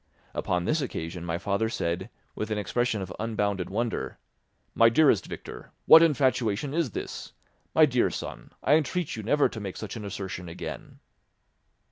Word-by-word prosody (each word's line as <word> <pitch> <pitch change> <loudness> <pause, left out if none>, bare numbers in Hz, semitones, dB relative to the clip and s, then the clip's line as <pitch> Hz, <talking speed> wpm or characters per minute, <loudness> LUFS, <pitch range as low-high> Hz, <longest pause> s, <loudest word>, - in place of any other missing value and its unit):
Upon 90 -1 -1
this 155 - +1
occasion 85 -9 -4
my 85 -1 -2
father 100 +4 0
said, 90 -1 -2 0.2
with 105 - -4
an 110 - -1
expression 110 +1 0
of 90 -1 -7
unbounded 105 -4 -1
wonder, 115 +3 -2 0.6
"My 115 0 +6
dearest 135 - +4
Victor, - - -9
what 160 - +10
infatuation 135 -5 +2
is 165 -4 +1
this? - - -6 0.4
My 160 - +8
dear 125 -4 +2
son, - - -7
I 140 - +4
entreat 160 +2 +1
you 110 - -5
never 145 +7 +3
to 110 - -7
make 100 -3 -6
such 105 -3 -6
an 110 - -6
assertion 95 -3 -5
again." 85 - -7
110 Hz, 160 wpm, -27 LUFS, 95-130 Hz, 0.6 s, what